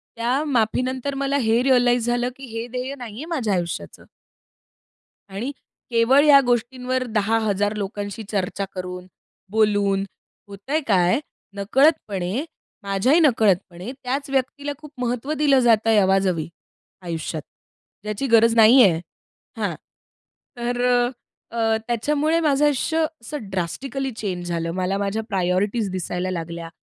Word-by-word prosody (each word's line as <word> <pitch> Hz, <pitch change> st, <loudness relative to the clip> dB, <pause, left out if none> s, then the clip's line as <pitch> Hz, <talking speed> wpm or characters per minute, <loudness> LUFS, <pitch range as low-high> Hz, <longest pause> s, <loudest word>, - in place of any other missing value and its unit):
त्या 245 Hz, +5 st, 0 dB
माफीनंतर 255 Hz, +1 st, 0 dB
मला 275 Hz, +1 st, 0 dB
हे 230 Hz, -2 st, +2 dB
रिअलाईज 245 Hz, -2 st, +3 dB
झालं, 240 Hz, +1 st, +1 dB
की 270 Hz, -, -10 dB
हे 230 Hz, +1 st, -4 dB
ध्येय 255 Hz, +3 st, -4 dB
नाहीये 240 Hz, +3 st, -7 dB
माझ्या 265 Hz, -, -1 dB
आयुष्याचं. 170 Hz, -, -4 dB, 1.2 s
आणि 210 Hz, +8 st, -4 dB, 0.4 s
केवळ 245 Hz, +4 st, +4 dB
या 285 Hz, -2 st, +8 dB
गोष्टींवर 250 Hz, +2 st, 0 dB
10,000 210 Hz, -1 st, +1 dB
लोकांशी 205 Hz, +2 st, -5 dB
चर्चा 195 Hz, -1 st, -2 dB
करून, 180 Hz, 0 st, -6 dB, 0.4 s
बोलून, 205 Hz, -2 st, +2 dB, 0.4 s
होतंय 200 Hz, +10 st, -3 dB
काय? 185 Hz, +2 st, +3 dB, 0.4 s
नकळतपणे, 210 Hz, -, +1 dB, 0.4 s
माझ्याही 200 Hz, -, +2 dB
नकळतपणे, 205 Hz, -, +2 dB
त्याच 270 Hz, +3 st, -2 dB
व्यक्तीला 275 Hz, +2 st, -1 dB
खूप 300 Hz, -1 st, -13 dB
महत्व 250 Hz, +4 st, -2 dB
दिलं 285 Hz, -2 st, +4 dB
जातंय, 225 Hz, -2 st, +4 dB
अवाजवी 190 Hz, -4 st, +2 dB, 0.5 s
आयुष्यात, 165 Hz, -2 st, -4 dB, 0.6 s
ज्याची 215 Hz, +6 st, -3 dB
गरज 230 Hz, -1 st, +5 dB
नाहीये. 225 Hz, -1 st, +7 dB, 0.7 s
हां. -, -, -2 dB, 0.8 s
तर 245 Hz, +1 st, -2 dB
अ, 245 Hz, -1 st, +3 dB, 0.5 s
अ, 225 Hz, -1 st, +2 dB
त्याच्यामुळे 295 Hz, +7 st, +1 dB
माझं 295 Hz, -2 st, +2 dB
आयुष्य 295 Hz, +3 st, +1 dB, 0.2 s
असं 230 Hz, -3 st, -7 dB
ड्रास्टिकली 260 Hz, +10 st, -3 dB
चेंज 180 Hz, -5 st, -4 dB
झालं. 165 Hz, -1 st, -2 dB
मला 185 Hz, +1 st, -1 dB
माझ्या 200 Hz, +2 st, -2 dB
प्रायोरिटीज 195 Hz, +3 st, 0 dB
दिसायला 185 Hz, 0 st, -3 dB
लागल्या. 170 Hz, -1 st, -5 dB
225 Hz, 120 wpm, -22 LUFS, 195-260 Hz, 1.2 s, या